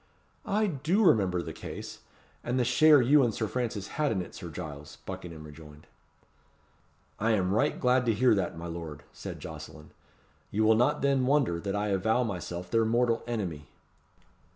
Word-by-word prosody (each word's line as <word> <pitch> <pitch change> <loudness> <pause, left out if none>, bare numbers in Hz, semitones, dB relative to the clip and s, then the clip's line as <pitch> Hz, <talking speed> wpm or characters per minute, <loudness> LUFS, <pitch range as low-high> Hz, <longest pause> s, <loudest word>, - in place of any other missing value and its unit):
"I 215 +2 +2
do 170 +4 +1
remember 95 - +3
the - - -6
case, - - -8 0.4
and 120 +2 -1
the 125 - +3
share 140 +3 +6
you 145 +4 +5
and 120 -3 +2
Sir 110 - -2
Francis 110 -4 -3
had 150 - +2
in 95 -4 -1
it, - - -12
Sir 85 - -8
Giles," 75 -3 -8
Buckingham 80 -3 -7
rejoined. 75 0 -13 1.3
"I 115 +2 +2
am 95 -2 +1
right 110 - +1
glad 125 0 +2
to 115 - +4
hear 125 +3 +4
that, 95 -5 -1
my 85 - -7
lord," 85 -3 -7
said - - -7
Jocelyn. 75 -1 -10 0.6
"You 110 +2 0
will 110 +1 +6
not 120 +4 +2
then 135 -2 +2
wonder 135 -12 +2
that 100 +3 -3
I 105 +1 -1
avow 110 +5 +2
myself 90 -4 -5
their 115 0 +3
mortal 115 +1 +1
enemy." 90 -11 -4
110 Hz, 175 wpm, -29 LUFS, 85-125 Hz, 1.3 s, share